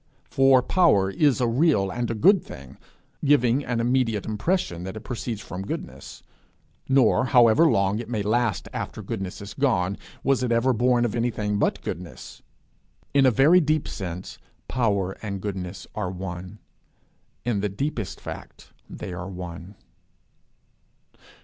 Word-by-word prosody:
For 135 -1 +5
power 125 - +3
is 140 +6 +2
a 125 - +2
real 115 - +2
and 120 +3 -2
a 115 - -2
good 185 - +5
thing, 65 0 -11 0.5
giving 140 -2 +3
an 120 -3 -2
immediate 115 -3 +1
impression 105 - -1
that 95 +4 -6
it - - -7
proceeds 115 -3 -4
from 90 0 -7
goodness. 95 - -7 0.7
Nor, 130 -1 +4
however 125 +5 +5
long 100 -1 +1
it 115 -1 -7
may 110 -4 -1
last 110 -3 0
after 110 - -5
goodness 95 -3 -5
is 100 0 -8
gone, 100 -9 0 0.2
was 135 -2 +2
it 125 -2 -1
ever 120 +3 +3
born 120 +1 +2
of 115 - -2
anything 110 -4 -1
but - - 0
goodness. 90 +1 -7 0.7
In 140 -2 +5
a - - +7
very 140 - +5
deep 155 -1 0
sense, 90 -1 -6 0.3
power 100 -6 0
and 100 -3 -4
goodness 95 -2 -5
are 105 -4 -3
one. 90 +1 -7 0.9
In 120 -4 0
the 105 +1 -1
deepest 110 0 -4
fact - - -10 0.2
they 95 -4 -7
are 90 +2 -6
one. 90 +1 -8
110 Hz, 150 wpm, -25 LUFS, 95-130 Hz, 0.9 s, a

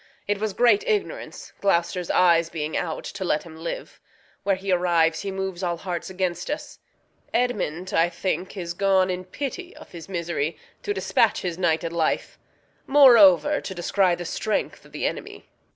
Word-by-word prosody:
It 205 0 0
was 215 -1 -2
great 245 - +4
ignorance, 440 +3 -3
Gloucester's 175 -2 +1
eyes 170 -2 +4
being 155 -2 -4
out, 160 -2 -2
To 195 - -6
let 155 -4 0
him 165 -2 -12
live. 165 +1 -6 0.4
Where 200 -1 +1
he 190 +1 -4
arrives 170 -2 +2
he 200 - -4
moves 190 -1 -4
All 175 -2 -1
hearts 175 0 -5
against 180 -2 -2
us. 295 - -5 0.6
Edmund, 190 -8 -1
I 165 +1 +3
think, 185 +2 -3
is 170 -2 -4
gone, 190 0 +2
In 180 0 -4
pity 290 - -6
of 305 - -14
his 170 0 -10
misery, 170 -3 -2 0.2
to 415 - -3
dispatch 410 - +1
His 180 -1 -4
nighted 165 -1 0
life; 165 -2 -1 0.5
moreover, 230 - +6
to 190 - -6
descry 180 +1 +2
The 175 - -7
strength 215 +5 -2
o' - - -20
th' - - -15
enemy. - - -4
180 Hz, 170 wpm, -24 LUFS, 170-200 Hz, 0.6 s, moreover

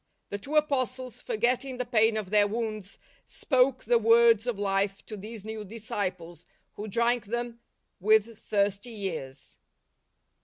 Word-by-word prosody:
The 205 - -4
two 280 +9 -5
Apostles, 255 -4 0
for - - -3
getting 250 +3 0
the 250 - -2
pain 225 -2 +3
of 205 -3 -4
their 205 -1 +5
wounds, 215 -2 -4 0.3
spoke 260 -1 +1
the 235 +1 +3
words 230 0 +5
of 240 -4 -1
life 195 0 -1
to 215 - -7
these 210 +1 -8
new 220 -1 -5
disciples, 185 -6 -5 0.3
who 210 - -6
drank 235 +1 +1
them 240 +3 -1
m 235 -1 -13 0.4
with 215 +2 +3
thirsty 205 +2 -1
ears. 135 -7 -5
220 Hz, 150 wpm, -28 LUFS, 200-240 Hz, 0.4 s, their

